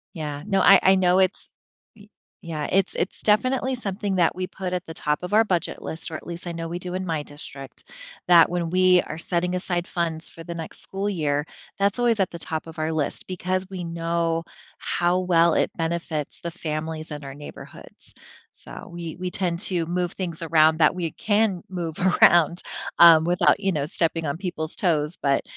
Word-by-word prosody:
Yeah. 150 -2 -5
No, 195 -2 +1
I 195 +1 +8
I 190 - +6
know 185 -1 +3
it's 190 +1 +1 0.5
Y 205 -1 -17 0.3
yeah, 155 -3 -4
it's 195 0 +1
it's 185 - -3
definitely 255 +5 +2
something 200 -4 -3
that 175 -1 +2
we 185 0 -2
put 185 -1 -6
at 180 0 -3
the 160 - -8
top 150 +2 -1
of 180 - -3
our 220 +1 +6
budget 180 -5 -2
list- 160 +1 -5
or 160 - -4
at - - -11
least 170 +1 -6
I 175 - -3
know 165 0 -5
we 170 +1 -4
do 180 0 -6
in 185 0 -2
my 160 -4 -2
district- 140 -2 -11 0.4
that 170 -2 +7
when 175 -1 -2
we 185 0 +5
are 155 - -7
setting 180 +1 -1
aside 175 -1 -2
funds 165 -2 -2
for 165 - -11
the 170 0 -6
next 165 -1 -8
school 195 +2 -3
year, 150 -6 0 0.4
that's 200 +3 +2
always 235 -3 +2
at 190 - +1
the 170 - -8
top 160 0 -4
of 160 - -11
our 155 +1 -1
list. 155 -3 -2
Because 185 +1 -2
we 185 -2 -5
know 165 0 -1 0.3
how 175 +1 0
well 170 -2 +3
it - - +1
benefits 165 -3 -3
the 170 - -4
families 155 -1 -4
in 150 -1 -6
our 135 -1 -8
neighborhoods. 145 +1 -12 0.4
So - - -11
we 170 -2 -6
we 180 0 -4
tend 175 -3 -1
to 180 -5 -1
move 175 +1 -1
things 170 -4 -5
around 160 -1 +4
that 155 0 +4
we 175 -3 -2
can 210 -4 +1
move 170 -4 -4 0.3
around, 170 0 +5 0.4
um, 165 -2 +9
without, 175 +1 +3
you 195 -1 0
know, 150 -4 -1
stepping 165 +1 0
on 140 +1 -2
people's 170 -3 -4
toes, 155 -3 0
but 140 -1 +2
170 Hz, 200 wpm, -24 LUFS, 160-185 Hz, 0.5 s, um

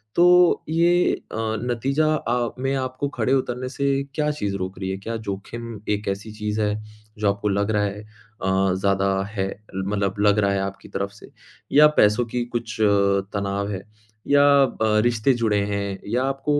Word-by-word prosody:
तो 180 0 +5
ये 170 +2 +3
अ, - - -8 0.2
नतीजा 125 +5 0
अ, 120 -4 -1
में 135 +1 0
आपको 130 +1 -2
खड़े 125 +1 0
उतरने 130 -1 -1
से 140 +1 0
क्या 150 -1 +1
चीज़ 100 -10 -3
रोक 95 0 -5
रही 95 -1 -3
है, 95 - -2
क्या 115 +4 -5
जोखिम 110 +3 -6
एक 105 0 -1
ऐसी 100 +2 -3
चीज़ 105 0 -3
है 105 -1 +1 0.4
जो 105 -1 +1
आपको 100 +1 -1
लग 100 +2 0
रहा 105 -1 +1
है, 100 0 -3
अ, 105 -3 -2
ज़्यादा 100 0 +1 0.3
है, 95 -3 -1
अ, - - -9 0.2
मतलब 100 +1 -1
लग 105 0 +4
रहा 100 -1 +2
है 100 - 0
आपकी 95 0 -6
तरफ 100 0 -3
से, 100 - -15 0.4
या 150 +1 +8
पैसों 105 +3 +4
की 120 +1 -2
कुछ 115 -1 -3
अ, 100 -1 +3
तनाव 100 0 -2
है, 95 -2 -4 0.5
या 145 0 +5 0.2
अ, 130 - -3 0.3
रिश्ते 120 +3 +2
जुड़े 105 -3 +2
हैं, 100 -1 -3
या 120 +5 0
आपको 135 +2 0
105 Hz, 185 wpm, -23 LUFS, 100-130 Hz, 0.5 s, या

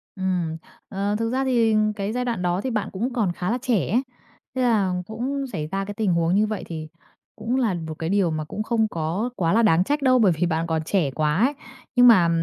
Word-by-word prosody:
Ừm, 180 -4 -1 0.3
ờ, 200 +1 -1
thực 225 0 0
ra 265 +1 0
thì 230 -4 +3 0.2
cái 200 0 -3
giai 250 +1 -1
đoạn 235 -6 -2
đó 180 +1 0
thì 260 - -2
bạn 215 -3 -2
cũng 235 +7 -3
còn 215 -8 +1
khá 180 +3 -3
là 240 - +1
trẻ 245 -7 0
ấy. 240 +5 +3 0.5
Thế 260 - 0
là 210 -7 +2
cũng 265 +6 -3
xảy 155 -11 -4
ra 195 0 -2
cái 205 - -6
tình 205 -4 0
huống 170 +1 +2
như 210 +2 +3
vậy 215 -1 -4
thì 155 -2 -6 0.5
cũng 240 +3 -2
là 240 -7 +1
một 160 -2 -5
cái 160 - -2
điều 190 -4 +2
mà 155 0 -2
cũng 210 +7 -4
không 220 -1 +1
có 170 +7 -2
quá 165 -5 +1
là 230 - +4
đáng 180 -4 +4
trách 290 +8 -1
đâu, 255 -2 +4
bởi 205 -6 +5
vì 165 +2 0
bạn 165 -1 -1
còn 160 -1 0
trẻ 160 -4 0
quá 150 +3 0
ấy. 280 - 0 0.4
Nhưng 245 0 +7
mà, 185 -8 +6
200 Hz, 245 wpm, -23 LUFS, 170-235 Hz, 0.5 s, Nhưng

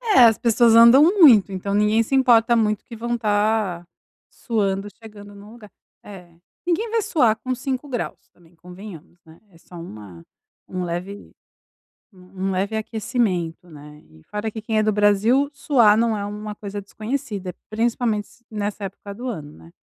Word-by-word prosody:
É, - - +7
as 225 -2 +4
pessoas 230 0 +3
andam 235 +5 +8
muito, 300 - +6
então 195 +1 -4
ninguém 210 +2 +2
se 270 - -2
importa 235 -3 +4
muito 215 -2 0
que 230 - -10
vão 235 +2 -3
estar 210 -5 0 0.4
suando, 200 -3 -2
chegando 205 -2 -13
em 200 - -13
um 210 +2 -14
lugar. 220 -3 -14 0.3
É, 185 -4 -12 0.4
ninguém 430 +7 0
vai 455 0 0
suar 240 - +2
com 255 +2 -4
5 265 +2 -4
graus 245 -3 -5
também 170 -1 -24
convenhamos, 180 -1 -13
né, 160 +1 -18
é 165 - -20
só 175 - -17
uma 105 - -11 0.5
um 185 -1 -4
leve, 180 +4 -6 0.8
um 190 +1 -6
leve 200 +4 -2
aquecimento, 205 -7 -2
né, 150 0 -13
e 80 0 -20
fora 210 +1 -5
que 220 +1 -7
quem 220 0 -1
é 215 - +3
do 215 0 +1
Brasil, 210 +7 +2
suar 245 -7 +3
não 225 -1 +1
é 200 - -4
uma 210 +1 -6
coisa 205 -1 -7
desconhecida, 205 -3 -5 0.2
principalmente 225 -1 -1 0.2
nessa 210 -1 -4
época 200 +1 -8
do 250 +4 -6
ano, 155 -10 -7
né. 165 - -17
210 Hz, 170 wpm, -22 LUFS, 190-230 Hz, 0.8 s, andam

